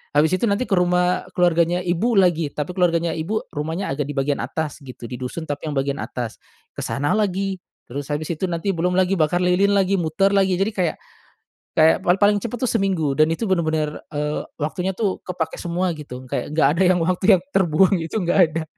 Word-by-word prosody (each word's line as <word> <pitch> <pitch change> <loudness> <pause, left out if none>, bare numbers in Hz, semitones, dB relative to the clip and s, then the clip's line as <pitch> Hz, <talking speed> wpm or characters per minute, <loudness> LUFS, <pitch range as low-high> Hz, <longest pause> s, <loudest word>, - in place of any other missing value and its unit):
Habis 160 +5 +4
itu 235 - +1
nanti 200 +4 +1
ke 200 - +1
rumah 180 0 +1
keluarganya 175 0 +2
ibu 185 +7 0
lagi, 175 -4 +3
tapi 150 +4 -3
keluarganya 170 -2 +1
ibu 195 +8 -2
rumahnya 160 +5 -3
agak 140 +1 -2
di 145 - -5
bagian 140 +1 0
atas 155 -2 -4
gitu, 125 -3 -10
di 125 - -3
dusun 130 +6 -5
tapi 145 +1 -5
yang 145 - -4
bagian 135 +1 -1
atas. 120 -3 -5 0.3
Ke - - -9
sana 145 +1 -1
lagi, 195 -2 -1 0.3
terus 140 +3 -6
habis 150 +3 -2
itu 175 +4 -2
nanti 170 +3 -1
belum 180 +2 0
lagi 185 0 +3
bakar 175 +3 +2
lilin 195 +3 +3
lagi, 195 0 +2
muter 175 +4 +1
lagi. 190 -2 +3
Jadi 205 +3 +1
kayak 180 -5 0 0.8
kayak 160 0 +5
pal 175 - +4
paling 205 0 +5
cepet 235 +3 -5
tuh 255 - +1
seminggu, 185 -10 0
dan 155 - +5
itu 225 +7 -3
bener-bener, 155 -4 0 0.2
eee, 150 0 -2 0.2
waktunya 180 +5 -2
tuh 200 -3 -1
kepake 165 -3 -3
semua 180 +1 -1
gitu. 130 -4 -8
Kayak - - -3
nggak 155 - +4
ada 190 - +3
yang 180 0 +4
waktu 180 +2 0
yang - - -18
terbuang 190 +1 +4
itu 165 +6 -3
nggak 175 +2 +1
ada. 165 0 -2
175 Hz, 205 wpm, -22 LUFS, 155-190 Hz, 0.8 s, kayak